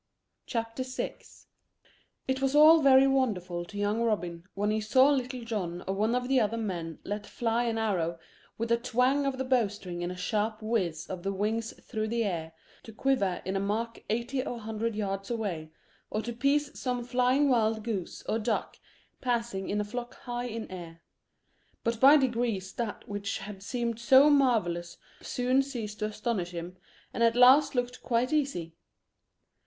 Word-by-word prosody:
CHAPTER 230 +1 -3
VI 255 0 -3 1.1
It 265 0 -1
was 270 +1 +1
all 310 +2 +8
very 270 -1 +7
wonderful 200 -11 0
to 205 +3 -10
young 205 +2 0
Robin 180 -7 -1
when 205 +1 0
he 215 0 0
saw 260 +6 +5
Little 255 -2 -2
John 180 -6 -3
or 190 - 0
one 215 +4 +1
of 250 0 -1
the 265 0 +3
other 225 0 0
men 175 -7 -4
let 205 0 -4
fly 235 0 0
an 230 -1 -1
arrow 180 -7 0 0.4
with 230 +1 -2
a 235 - +5
twang 255 +4 +1
of 270 -1 -1
the 265 - -1
bow 255 -4 +3
string 185 -3 -7
and 175 +1 -2
a - - -6
sharp 215 +3 -1
whizz 180 -7 -1
of 185 -1 -6
the 195 +2 -2
wings 220 +3 -2
through 220 -2 -2
the 230 +1 0
air, 165 -6 -3 0.3
to 225 - -11
quiver 215 -6 0
in 190 +1 -2
a - - +1
mark 220 +4 -2
eighty 240 +4 -1
or 245 - -4
a 235 - -8
hundred 220 +1 -3
yards 195 -2 -3
away, 195 -10 -3 0.4
or 215 - -2
to 235 +2 -4
pierce 280 +4 +1
some 250 -2 -2
flying 250 +3 +2
wild 220 -4 +2
goose 210 -6 -4
or 220 - -1
duck 220 0 -2 0.4
passing 235 -6 -1
in 210 - 0
a - - +1
flock 240 +4 -6
high 245 0 -4
in 230 -1 -5
air; 170 -2 -9 0.8
but 230 -1 -1
by 280 +4 +8
degrees 235 -8 -1
that 230 -3 -4
which 205 -1 -3
had 195 0 -8
seemed 235 +1 -2
so 265 +5 +6
marvellous 210 -12 +2 0.2
soon 255 +2 +1
ceased 230 -6 -5
to 215 - 0
astonish 215 -3 -2
him, 175 +1 -7 0.4
and - - -3
at 230 0 +4
last 260 +4 +6
looked 245 0 -2
quite 245 +3 0
easy. 270 - -1
225 Hz, 180 wpm, -29 LUFS, 200-250 Hz, 1.1 s, all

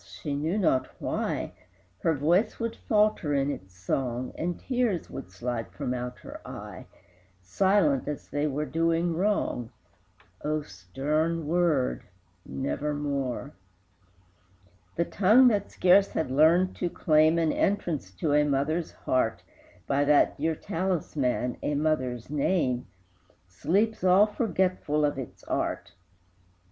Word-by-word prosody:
she 145 - -6
knew 155 +7 -1
not 130 -10 +2
why, - - -2 0.5
Her 165 - +1
voice 175 +10 +1
would 230 -1 -2
falter 210 -9 +1
in 140 +1 +1
its 95 -7 -9
song, 125 +6 -2
And 175 +1 -3
tears 245 -8 -1
would - - -7
slide 115 +5 -4
from 125 - -3
out 125 0 -5
her - - -10
eye, - - -9 0.5
Silent, 155 - +2
as 150 - -5
they 145 +1 -1
were 150 +1 -2
doing 165 +2 0
wrong. 175 - 0 0.7
O 155 0 -1
stern 150 - -2
word 160 -5 +1 0.5
Nevermore! 140 -1 -3 1.4
The 170 - +1
tongue 220 +9 +5
that 205 -3 -1
scarce 190 +2 +4
had 150 -5 -1
learned 165 +6 +4
to 175 - -1
claim 155 0 +3
An 165 -2 +2
entrance 170 - -1
to 145 - 0
a 150 0 +5
mother's 150 +4 0
heart 130 -3 -1 0.4
By 140 +1 +1
that 145 0 +4
dear 160 +2 -1
talisman, 150 -9 -1
a 150 - -1
mother's 130 -6 -1
name, 140 -4 0 0.6
Sleeps 185 - 0
all 185 +3 +6
forgetful 185 -8 0
of 145 -2 -1
its 130 - -8
art! - - -3
150 Hz, 125 wpm, -27 LUFS, 135-180 Hz, 1.4 s, all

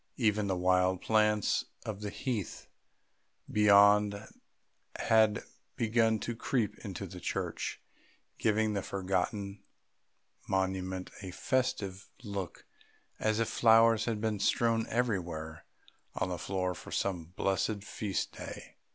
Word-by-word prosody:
Even 105 -4 +2
the 95 - 0
wild 90 0 +2
plants 105 -1 +2 0.2
of 105 -2 -5
the 105 - -3
heath 105 -3 -4 0.9
beyond 100 0 +5 0.8
had 110 -2 +3 0.3
begun 115 -1 +2
to 120 +3 -4
creep 115 -2 -1
into 100 -2 -6
the 90 -1 -9
church, - - -3 0.6
giving 110 0 +2
the 100 - -1
forgotten 100 +2 -2 0.9
monument 95 -1 -1
a 95 - -6
festive 100 -2 -1
look 100 -4 -5 0.5
as 110 0 +1
if 115 - +1
flowers 115 -1 +5
had 115 -3 -1
been 110 -1 -1
strewn 115 +2 +2
everywhere 85 -9 -2 0.5
on 90 - -1
the 90 -2 -3
floor 90 0 -1
for 85 - -11
some 90 -4 -1
blessed 100 +2 0
feast 105 -2 -3
day. - - -9
100 Hz, 115 wpm, -31 LUFS, 95-110 Hz, 0.9 s, beyond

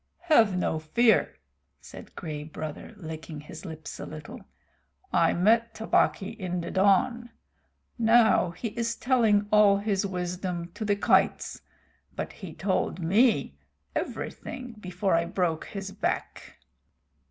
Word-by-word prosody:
"Have 215 -9 +5
no 160 -3 0
fear," 220 +10 +3 0.4
said - - -12
Gray 155 -4 -5
Brother, 155 0 -7
licking 160 -3 -7
his 160 +3 -10
lips 160 -3 -8
a - - -5
little. 155 -1 -9 0.7
"I 165 - +4
met 225 +6 +3
Tabaqui 220 -3 +1
in 180 -2 -2
the 170 - -5
dawn. 205 +5 +2 0.7
Now 225 -4 +5
he 175 +7 -5
is 230 +1 -2
telling 220 -5 +2
all 210 -2 +6
his 200 -1 0
wisdom 180 -2 -3
to 225 - -5
the 205 -1 +2
kites, 200 - +2 0.5
but - - -4
he 190 -5 -9
told 190 +1 -1
me 175 - +2 0.4
everything 250 -1 -5
before 185 0 -1
I 165 0 +3
broke 170 -3 -1
his 195 -1 -6
back. - - -4
190 Hz, 130 wpm, -27 LUFS, 165-215 Hz, 0.7 s, all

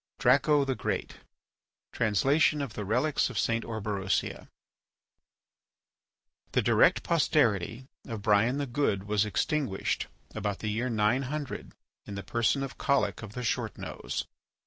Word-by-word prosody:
DRACO 140 +3 +4
THE 135 - 0
GREAT - - -3 0.8
(Translation 135 +8 +3
of 140 - -6
the 105 - -4
Relics 135 +10 +1
of 125 - -6
St. 115 +1 +1
Orberosia) 105 -4 -2 2.0
The - - +3
direct - - +4
posterity 110 +4 +1 0.2
of 110 -4 -5
Brian 110 +5 +3
the 145 - -1
Good 120 -7 0
was 105 0 +1
extinguished 105 0 -1 0.3
about 100 -1 -2
the 110 - -3
year 120 +4 -1
900 130 +6 -1 0.3
in 100 - -6
the 100 - -5
person 115 +4 +1
of 135 - -7
Collic 105 -8 +1
of 105 -2 -8
the 125 - -5
Short 120 -2 -1
Nose. - - -4
115 Hz, 130 wpm, -29 LUFS, 105-135 Hz, 2.0 s, DRACO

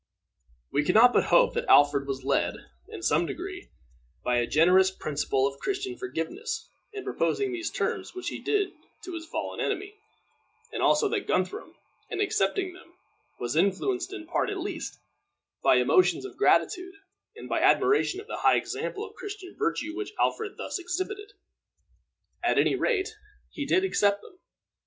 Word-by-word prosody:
We 145 - +2
can 180 - +1
not 245 +3 +8
but - - +3
hope - - +4
that 480 +1 -2
Alfred 145 -1 +5
was 135 -1 -4
led, 135 +1 +1 0.3
in 115 - -8
some 155 +8 +2
degree, 360 0 -6 0.5
by 125 0 +1
a 120 0 +1
generous 180 +5 +5
principle 145 -6 -1
of 140 0 -3
Christian 390 -1 -3
forgiveness 395 - -4 0.2
in 405 -2 -6
proposing 405 -2 0
the 355 -1 -4
terms - - -2
which 370 - -3
he - - -6
did 405 -2 +1 0.3
to 365 - -7
his 330 -1 -6
fallen - - -4
enemy, 400 0 -2 0.8
and - - -3
also 440 - +4
that 405 -2 -2
Guthrum, 185 0 -1 0.3
in - - -4
accepting 375 -2 0
them, 350 -1 -17 0.4
was 120 +3 -3
influenced, 345 - +1
in 380 -5 -7
part 340 - 0
at 405 - -3
least, 380 +3 -5 0.7
by - - +6
emotions 370 +1 +3
of 395 - -8
gratitude 370 +1 +2 0.4
and - - -9
by - - 0
admiration 390 -1 +3
of 415 - -9
the 440 - -5
high - - +4
example 420 +2 -3
of - - -12
Christian 405 -2 -8
virtue 320 - -2
which 410 +2 -5
Alfred 440 -3 0
thus - - -4
exhibited. 375 +4 -4 1.1
At - - +2
any - - +4
rate, 435 -3 0 0.4
he 290 -2 -5
did 370 +6 +3
accept 205 - +2
them. 365 - -16
365 Hz, 165 wpm, -27 LUFS, -, 1.1 s, not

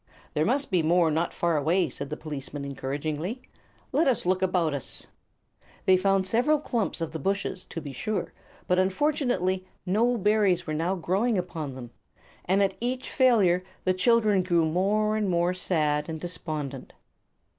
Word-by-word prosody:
"There 155 - +1
must 275 +3 0
be 180 -3 +3
more 165 0 +3
not 165 +3 0
far 170 -2 0
away," 165 +5 +2
said 140 -2 -6
the 150 - -4
policeman, 145 -2 -6
encouragingly. 150 - -4 0.5
"Let 300 +4 +2
us 250 -8 +1
look 185 +1 +1
about 180 -4 +1
us." 140 - +2 0.8
They 190 - +6
found 195 0 +2
several 245 +10 +3
clumps 230 - -2
of 165 -1 -2
the 160 - -5
bushes, 195 0 -2
to - - -6
be 145 -3 -8
sure; 210 +11 -3 0.3
but 180 0 +2
unfortunately 190 - +1 0.2
no 230 +6 +2
berries 205 -4 +2
were 155 - -3
now 165 +5 0
growing 195 +6 0
upon 160 -6 -4
them, 120 -2 -9 0.5
and 195 +3 +3
at 195 - +1
each 255 +2 -2
failure 205 -9 +4 0.2
the 185 - +2
children 210 +1 +3
grew 175 -3 +2
more 205 +6 +1
and 210 -2 0
more 175 0 +1
sad 150 -4 0
and 160 -1 -4
despondent. 155 -6 -4
180 Hz, 165 wpm, -27 LUFS, 160-210 Hz, 0.8 s, They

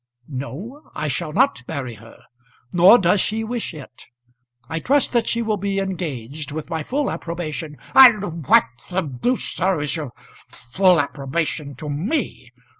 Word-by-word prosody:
"No; 155 - -7
I 155 - -2
shall 155 +3 -2
not 255 - +2
marry 135 -6 -4
her. 115 +1 -15 0.5
Nor 180 +6 +8
does 190 -1 +3
she 220 +1 -1
wish 235 +1 -3
it. 145 -6 -12 0.6
I 165 +4 -3
trust 280 - +1
that 235 -2 +2
she 235 0 0
will 215 -2 0
be 200 0 -2
engaged, 155 -8 -4
with 155 +1 -6
my 160 - -1
full 275 - -1
approbation 160 -2 -5
" - - -20
"And 210 - +6
what - - +6 0.2
the 185 +1 0
deuce, 155 - -2
sir, 185 -1 +1
is 145 +2 -2
your 150 -6 -5 0.4
full 180 +8 +2
approbation 145 +1 -2
to 150 +4 -8
me? 165 - -3
170 Hz, 160 wpm, -21 LUFS, 145-205 Hz, 0.6 s, Nor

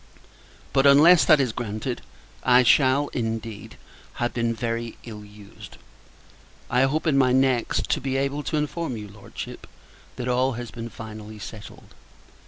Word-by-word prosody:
But, 135 +1 +4
unless 155 +5 +7
that 155 -2 +6
is 130 -4 +1
granted, 115 +2 -4 0.4
I 125 0 +5
shall, 135 +3 +4
indeed, 115 -3 -5 0.4
have 120 0 -2
been 115 -1 0
very 115 0 -3
ill 105 -3 -9
used! 105 -1 -14 0.9
I 125 - +3
hope, 150 +5 -1
in 145 -4 +3
my 130 -2 +4
next, 130 -2 +1
to 150 - 0
be 135 0 -1
able 140 +2 -1
to 155 - -1
inform 150 -3 -3
your 105 -2 -9
Lordship 100 0 -9 0.5
that 125 - -5
all 125 +1 +1
has 120 0 -7
been 115 0 -7
finally 110 -1 -9
settled. 105 +1 -11
125 Hz, 150 wpm, -24 LUFS, 110-135 Hz, 0.9 s, unless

